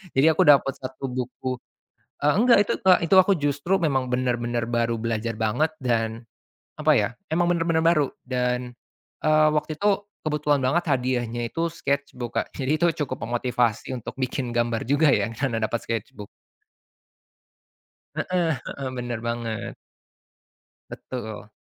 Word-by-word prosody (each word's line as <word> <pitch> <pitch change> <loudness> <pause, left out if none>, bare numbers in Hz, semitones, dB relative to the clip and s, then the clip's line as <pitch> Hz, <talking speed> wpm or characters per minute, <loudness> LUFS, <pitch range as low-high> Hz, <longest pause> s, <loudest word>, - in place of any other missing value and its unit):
jadi 150 +4 +5
aku 185 - +4
dapat 140 -2 +6
satu 130 +1 -6
buku 125 +1 -3 0.7
eee, 150 - +5
enggak 245 -1 +6
itu - - +1
Kak, 185 -1 +6
eee, 190 +3 +4
aku 190 +1 +5
justru 145 +6 +1
memang 135 -5 +1
benar-benar 120 -2 -1
baru 120 -1 0
belajar 115 0 -2
banget 120 +9 +1
dan, 115 -1 0 0.6
apa - - +3
ya - - +2 0.2
emang 175 +2 +2
benar-benar 165 -1 +1
baru. 155 -5 +4 0.2
Dan, 125 -1 -1 0.5
eee, 155 0 +5
waktu 150 0 -1
itu 205 0 +1 0.2
kebetulan 150 -2 +1
banget 165 +7 +1
hadiahnya 120 -2 -1
itu 170 0 -1
sketchbook, 140 -6 -3 0.2
jadi 140 +3 0
itu 175 - +4 0.2
cukup 130 -3 -6
memotivasi 120 0 0
untuk 120 - -7
bikin 130 -1 -2
gambar 120 -1 0
juga 145 +3 +4
ya - - +1
karena 120 -1 -1
dapat 115 +2 -1
sketchbook. 115 -1 -4 1.9
Heeh 180 -2 0 0.2
heeh, 135 -2 -5
benar 120 -2 -3
banget. 115 -2 -3 1.2
Betul. 110 -4 -7
130 Hz, 135 wpm, -24 LUFS, 120-155 Hz, 1.9 s, dapat